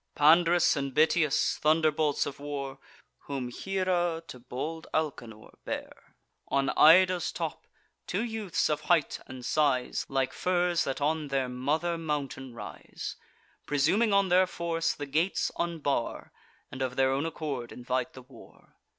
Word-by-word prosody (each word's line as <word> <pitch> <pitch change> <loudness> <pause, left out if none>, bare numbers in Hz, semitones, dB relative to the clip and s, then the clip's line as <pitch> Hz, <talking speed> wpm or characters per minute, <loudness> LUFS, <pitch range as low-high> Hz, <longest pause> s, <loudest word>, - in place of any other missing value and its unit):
Pand'rus 170 +3 +5
and 140 -3 -3
Bitias, 155 -1 +3
thunderbolts 155 -1 +2
of 140 - -6
war, 140 -2 -5 0.5
Whom 135 -3 -3
Hiera 175 +1 -1
to 125 - -9
bold 140 +7 -5
Alcanor 120 -8 -3
bare - - -7 0.3
On 135 0 +1
Ida's 180 +2 +5
top, - - -5 0.4
two 195 +5 -1
youths 220 -6 -1
of 150 0 -1
height 160 -1 +1
and 130 -2 -9
size 140 -3 +1
Like 135 -1 0
firs 175 -1 +1
that 135 +1 -3
on 155 +1 0
their 135 -2 0
mother 150 +7 -1
mountain 140 -5 -4
rise, 95 -10 -7 0.5
Presuming 170 +11 +2
on 200 -1 +3
their 185 +1 +5
force, 165 -2 -1
the 145 - -5
gates 160 +7 0
unbar, 155 -8 -2 0.4
And 135 - -7
of 130 -1 -2
their 130 0 +3
own 140 +4 0
accord 145 -7 -4
invite 125 0 -3
the 130 - -11
war. 130 +2 -18
150 Hz, 140 wpm, -29 LUFS, 135-170 Hz, 0.5 s, Pand'rus